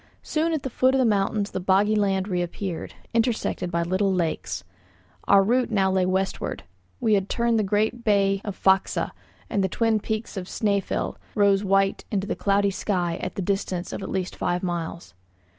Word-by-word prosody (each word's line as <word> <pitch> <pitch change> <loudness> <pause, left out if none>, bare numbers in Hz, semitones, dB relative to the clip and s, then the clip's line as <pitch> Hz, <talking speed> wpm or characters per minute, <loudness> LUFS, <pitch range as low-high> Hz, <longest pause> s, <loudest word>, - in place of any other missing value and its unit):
Soon 320 +2 0
at 315 -4 -1
the 265 - -2
foot 260 +3 +3
of - - +4
the 260 - +3
mountains 205 -1 +1
the - - -3
boggy 195 +3 +3
land 195 -2 +1
reappeared, 180 -1 -3 0.2
intersected 225 -5 0
by 170 -1 0
little 190 +3 +1
lakes. 175 -4 -2 0.6
Our 200 -1 +6
route 245 +5 +2
now 195 -4 +2
lay 185 -1 +2
westward; 190 +1 -2 0.4
we 220 - +2
had 195 -1 +1
turned 235 -1 +1
the - - +2
great 215 +4 0
bay 195 -2 +2
of 205 -2 -5
Faxa, 190 0 +2 0.4
and 200 - 0
the 190 - +1
twin 225 +2 +1
peaks 220 0 -4
of 180 -1 -4
Snæfell 200 -2 -1 0.2
rose 200 -1 +4
white 195 0 +2
into 200 -3 -1
the - - -2
cloudy 200 0 +2
sky 180 -4 -1
at 185 - -5
the 195 - -2
distance 185 -2 -2
of - - -4
at - - -5
least 185 -1 -2
five 175 +1 -1
miles. 170 - -4
195 Hz, 185 wpm, -25 LUFS, 185-215 Hz, 0.6 s, Our